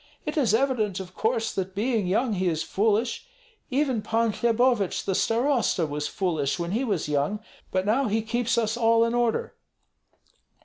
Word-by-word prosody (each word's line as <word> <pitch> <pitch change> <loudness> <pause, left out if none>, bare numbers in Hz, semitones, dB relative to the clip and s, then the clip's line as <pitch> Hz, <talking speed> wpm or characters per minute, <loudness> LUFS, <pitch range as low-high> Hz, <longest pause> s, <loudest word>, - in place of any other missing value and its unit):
It 300 - -3
is 250 -8 +3
evident, 225 -7 0
of 185 -1 -8
course, 225 +1 -1
that 190 0 -4
being 220 -2 0
young 220 +5 +1
he 185 -1 0
is 160 -2 0
foolish. 225 - 0 0.4
Even 265 -4 0
Pan 225 +1 +1
Hlebovich 235 -3 +1
the 195 - 0
starosta 230 - +1
was 150 0 -3
foolish 160 -4 -1
when 170 0 -3
he 230 +6 0
was 200 - -1
young, 150 +8 0 0.3
but 185 0 -1
now 240 +5 +2
he 220 +1 0
keeps 235 +1 0
us 225 -1 +1
all 230 -1 +3
in 230 - -1
order." 240 - 0
225 Hz, 170 wpm, -26 LUFS, 190-240 Hz, 0.4 s, is